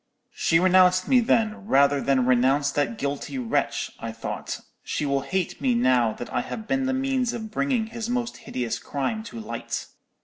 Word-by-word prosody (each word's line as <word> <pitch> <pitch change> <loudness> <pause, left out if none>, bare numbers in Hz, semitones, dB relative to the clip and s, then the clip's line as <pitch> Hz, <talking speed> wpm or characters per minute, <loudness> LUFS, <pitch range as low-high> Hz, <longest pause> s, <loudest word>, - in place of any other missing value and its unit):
"'She 165 - +2
renounced 185 0 +5
me 255 - +5
then, 225 -4 +1
rather 140 -3 +4
than 130 -2 +2
renounce 130 +3 +3
that 135 -6 -1
guilty 140 - -3
wretch,' 245 -2 -1
I - - -4
thought; - - -5 0.2
'she 150 - -2
will 140 -1 +1
hate 180 +4 -2
me 130 -3 +2
now 120 -1 +3
that 120 - -8
I - - +1
have 220 -1 -7
been 270 -1 0
the - - +1
means 260 -2 0
of 220 -2 -6
bringing 250 -1 0
his 230 +1 -5
most 245 -1 -2
hideous 120 -3 -3
crime 145 +10 -2
to 230 - -8
light.' 220 - -4
185 Hz, 180 wpm, -25 LUFS, -, 0.2 s, renounced